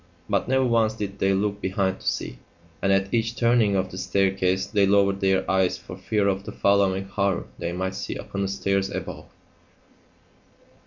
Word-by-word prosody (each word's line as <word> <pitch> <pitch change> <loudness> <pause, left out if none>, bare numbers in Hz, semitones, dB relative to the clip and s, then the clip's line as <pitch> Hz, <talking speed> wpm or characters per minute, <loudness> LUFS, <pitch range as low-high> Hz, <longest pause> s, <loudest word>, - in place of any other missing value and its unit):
But - - 0
never 130 0 +2
once 115 -2 +2
did 100 -2 -5
they 95 - +2
look 100 +1 0
behind 95 0 -1
to - - -10
see; - - -2 0.4
and 95 - +2
at 95 +1 +1
each 115 0 0
turning 115 -4 +3
of 95 -1 -1
the 90 - -6
staircase 95 -1 +1
they 100 0 +2
lowered 100 0 +3
their 95 -1 +2
eyes 95 -1 +2
for 90 - -10
fear 100 +2 0
of 95 0 0
the - - -7
following 100 -1 +2
horror 100 -1 -1
they 85 - -2
might 95 +2 -3
see - - -5
upon 100 - -5
the 100 - 0
stairs 100 0 0
above. 90 -4 -6
95 Hz, 180 wpm, -25 LUFS, 95-100 Hz, 0.4 s, turning